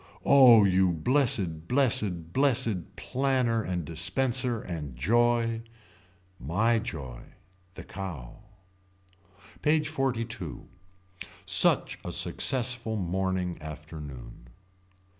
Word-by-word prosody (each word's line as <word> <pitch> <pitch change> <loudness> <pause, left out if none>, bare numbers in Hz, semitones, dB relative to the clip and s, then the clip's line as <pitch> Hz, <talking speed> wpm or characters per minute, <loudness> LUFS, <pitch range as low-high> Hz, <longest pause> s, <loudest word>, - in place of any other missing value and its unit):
Oh 125 -6 +7
you 95 -1 +3
blessed 90 - 0
blessed 100 - 0
blessed 110 -9 0
planner 125 0 0
and 90 -5 -3
dispenser 120 - -1
and 75 -9 -7
joy. 115 - +1 0.8
My 110 - +1
joy. 70 - -7 0.5
The - - -9
Cow. 85 -12 -8 1.2
PAGE 150 0 +1
XLII. 135 -6 -1 1.2
Such - - +4
a - - -5
successful 120 -3 -1
morning 95 -1 -2
afternoon. 75 -5 -10
105 Hz, 85 wpm, -27 LUFS, 85-125 Hz, 1.2 s, Oh